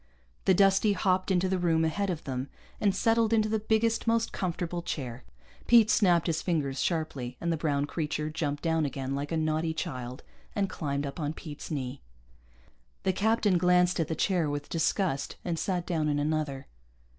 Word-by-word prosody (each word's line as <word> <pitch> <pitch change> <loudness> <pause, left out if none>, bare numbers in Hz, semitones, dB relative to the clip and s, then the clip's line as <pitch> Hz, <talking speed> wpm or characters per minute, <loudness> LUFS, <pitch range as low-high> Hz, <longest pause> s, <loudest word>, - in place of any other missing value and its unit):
The 190 - +5
Dustie 195 +2 +4
hopped 185 -1 +1
into 190 0 +2
the 185 0 0
room 165 -2 +2
ahead 200 +5 -1
of 170 -4 -3
them 130 -1 -4 0.3
and 200 -2 +2
settled 225 +2 +2
into 215 -1 +3
the 220 0 0
biggest, 220 +2 +1
most 230 0 +2
comfortable 175 -1 -3
chair. 130 -7 -5 0.4
Pete 230 -2 +6
snapped 175 -5 +4
his 165 -2 0
fingers 145 -7 -1
sharply, 145 -7 -2
and 170 0 0
the - - +1
brown 145 -2 0
creature 150 0 -3
jumped 145 -2 -2
down 160 -1 +2
again 135 -2 -3
like 140 +2 -3
a 165 - 0
naughty 160 +1 0
child 130 -7 -5 0.3
and 200 -1 +1
climbed 140 -2 -2
up 140 +4 -6
on 150 -1 -2
Pete's 150 -2 -8
knee. 135 -3 -4 1.0
The 190 - +2
captain 210 -2 +2
glanced 180 0 +3
at 165 - +1
the 160 - -2
chair 175 -2 +1
with 145 0 -4
disgust 165 -3 0
and 170 -2 -1
sat 180 -3 -1
down 160 -4 0
in 145 - +1
another. 145 -2 -1
165 Hz, 180 wpm, -29 LUFS, 145-190 Hz, 1.0 s, Pete